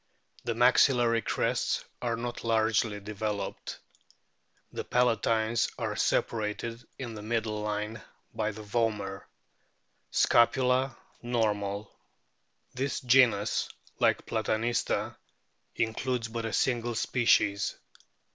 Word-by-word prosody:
The 115 -2 -1
maxillary 120 -1 +4
crests - - 0 0.2
are 120 -2 0
not 120 +1 -5
largely 110 -2 +1
developed. 105 0 -4 1.0
The - - -3
palatines 115 -2 +1
are - - -2
separated 115 +2 -1
in 120 -3 -6
the 105 - -7
middle 110 -1 -2
line 105 +1 -3 0.3
by 110 -1 -1
the 110 +1 -9
vomer. 105 -3 -1 0.9
Scapula 125 +2 +3 0.2
normal. 105 -4 -1 0.8
This 135 +2 -2
genus, 120 -5 +3 0.3
like - - +2
Platanista, 115 +2 -1 0.6
includes 115 +1 -1
but 115 0 -4
a 115 - -3
single 120 -2 0
species. 110 -4 +2
115 Hz, 95 wpm, -29 LUFS, 105-120 Hz, 1.0 s, maxillary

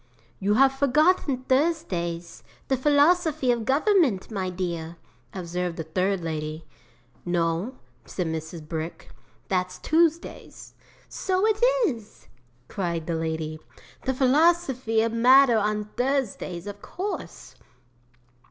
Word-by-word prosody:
'"You 205 +2 +1
have 270 +2 +5
forgotten 280 0 +2
Thursdays; 180 - -1 0.3
the 265 - +3
Philosophy 295 +1 +3
of 235 -2 -1
Government, 280 - +2
my 190 -3 -2
dear," 170 -2 -4 0.3
observed 180 -1 -4
a - - -2
third 185 +4 -1
lady. 155 -1 -4 0.6
'"No," 175 +7 -1 0.3
said 180 - -4
Mrs. 160 0 -5
Brick, 160 +1 -6 0.4
"that's 185 -1 -1
Tuesdays." 330 - -1 0.3
'"So 375 +1 -1
it 435 0 +1 0.3
is!" 225 - -7 0.4
cried 170 -4 -3
the 170 - -2
lady. 160 -1 -3 0.5
"The 265 0 0
Philosophy 265 -4 +2
of 230 0 -1
Matter 245 0 +6
on 210 0 -1
Thursdays, 245 -9 -2
of 205 0 -8
course." 390 +4 -6
215 Hz, 110 wpm, -25 LUFS, 170-275 Hz, 0.6 s, Matter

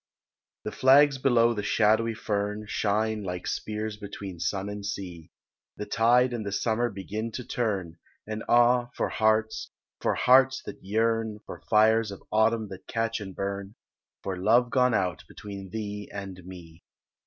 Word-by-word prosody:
THE - - -4
flags 135 +1 +5
below 120 -3 +4
the 105 - -3
shadowy 110 +2 +2
fern 105 0 -2
Shine 110 +1 0
like 90 -2 -5
spears 105 0 -3
between 100 -3 -8
sun 95 +4 -2
and 105 0 -6
sea, 90 -5 -6 0.5
The 105 - -4
tide 120 +3 +3
and 115 -2 -3
the 100 - -4
summer 115 +4 0
begin 105 +3 -5
to 125 - -5
turn, 95 -8 -2 0.3
And 110 0 -5
ah, 120 0 +4
for - - -1
hearts, 110 0 +1 0.3
for - - 0
hearts 130 +1 +4
that - - -9
yearn, 110 +1 0
For - - -9
fires 110 +1 +4
of 100 - -9
autumn 110 0 +2
that 95 -1 -10
catch 115 0 -1
and 95 -3 -8
burn, 100 +1 -4 0.5
For 95 - -3
love 115 +6 +3
gone 125 -3 +3
out 90 -4 -1
between 100 -2 -9
thee 105 0 -5
and 95 -2 -7
me. 85 -3 -12
110 Hz, 155 wpm, -27 LUFS, 100-115 Hz, 0.5 s, flags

